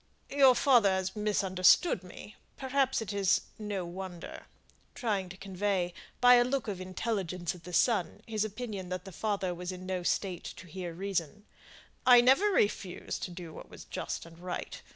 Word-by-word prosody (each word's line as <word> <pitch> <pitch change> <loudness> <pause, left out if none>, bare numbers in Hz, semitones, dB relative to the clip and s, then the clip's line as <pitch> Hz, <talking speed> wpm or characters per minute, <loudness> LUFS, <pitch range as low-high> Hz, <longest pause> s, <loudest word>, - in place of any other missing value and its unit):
"Your 270 -3 +6
father 240 -5 +5
has 190 +1 -1
misunderstood 195 - +3
me 185 +3 -11 0.2
perhaps 265 -2 +1
it 205 -1 -5
is 195 -2 +3 0.2
no 205 -4 -3
wonder," 180 0 -8 0.5
trying 205 -7 -1
to 185 - -10
convey, 190 -2 -1 0.3
by 250 0 +8
a 240 - +5
look 260 0 -1
of 195 -3 -4
intelligence 185 -3 -3
at 175 -2 -14
the 180 - -8
son, 210 +2 +1
his 215 -2 -1
opinion 210 -4 -5
that 185 -1 -4
the 195 - -8
father 195 -1 -1
was 180 +1 -5
in 185 0 -8
no 185 -1 -2
state 180 0 -1
to - - -10
hear 180 0 -6
reason. 195 +2 -3 0.6
"I 245 -1 +8
never 260 +11 +5
refused 205 - -1
to - - -7
do 175 -2 -8
what - - -11
was - - -11
just - - -5
and 165 0 -14
right. 180 0 -5
195 Hz, 175 wpm, -31 LUFS, 180-220 Hz, 0.6 s, by